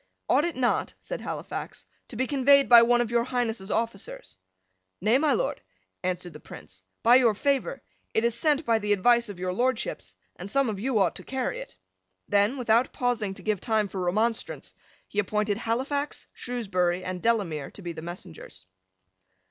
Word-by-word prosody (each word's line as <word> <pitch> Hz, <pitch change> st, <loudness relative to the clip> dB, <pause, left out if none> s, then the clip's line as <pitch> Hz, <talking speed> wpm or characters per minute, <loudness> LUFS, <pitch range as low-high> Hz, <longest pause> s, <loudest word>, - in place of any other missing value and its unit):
"Ought 295 Hz, -, +3 dB
it 345 Hz, -, -2 dB
not," 255 Hz, -1 st, 0 dB
said -, -, -6 dB
Halifax, -, -, -6 dB, 0.2 s
"to -, -, -11 dB
be 260 Hz, +4 st, 0 dB
conveyed 280 Hz, 0 st, +4 dB
by 235 Hz, -1 st, +9 dB
one 240 Hz, +1 st, +4 dB
of 235 Hz, -1 st, -2 dB
your 235 Hz, 0 st, +3 dB
Highness's 235 Hz, -5 st, -2 dB
officers?" 225 Hz, -3 st, -3 dB, 0.6 s
"Nay, 220 Hz, +8 st, +3 dB
my 305 Hz, 0 st, +2 dB
Lord," -, -, -1 dB, 0.4 s
answered 180 Hz, -1 st, -3 dB
the 150 Hz, -, -10 dB
Prince; 95 Hz, -9 st, -12 dB, 0.2 s
"by 240 Hz, +2 st, +7 dB
your 235 Hz, -5 st, +4 dB
favour, 280 Hz, -, -1 dB, 0.3 s
it 220 Hz, -, +3 dB
is 235 Hz, 0 st, +2 dB
sent 295 Hz, +5 st, +1 dB
by 230 Hz, -1 st, +3 dB
the 210 Hz, -1 st, +1 dB
advice 235 Hz, +3 st, +3 dB
of 200 Hz, -, -7 dB
your 180 Hz, 0 st, -2 dB
Lordships, 260 Hz, -, -2 dB, 0.2 s
and 185 Hz, +3 st, -7 dB
some 275 Hz, +2 st, +2 dB
of 205 Hz, -3 st, -4 dB
you 250 Hz, +2 st, 0 dB
ought 190 Hz, -4 st, +2 dB
to -, -, -10 dB
carry 265 Hz, -, -3 dB
it." -, -, -10 dB, 0.5 s
Then, 205 Hz, +6 st, +2 dB
without 235 Hz, 0 st, +2 dB
pausing 230 Hz, -6 st, -1 dB
to -, -, -11 dB
give 215 Hz, -3 st, -1 dB
time 220 Hz, -3 st, +1 dB
for 190 Hz, -1 st, -4 dB
remonstrance, 220 Hz, +6 st, -1 dB, 0.3 s
he 205 Hz, -, -3 dB
appointed 210 Hz, +1 st, 0 dB
Halifax, 270 Hz, +6 st, -2 dB
Shrewsbury, 185 Hz, -7 st, -1 dB
and 185 Hz, -1 st, -4 dB
Delamere 190 Hz, -11 st, 0 dB
to -, -, -12 dB
be 170 Hz, -1 st, -4 dB
the 160 Hz, -, -8 dB
messengers. 170 Hz, -, -10 dB
225 Hz, 180 wpm, -27 LUFS, 195-250 Hz, 0.6 s, by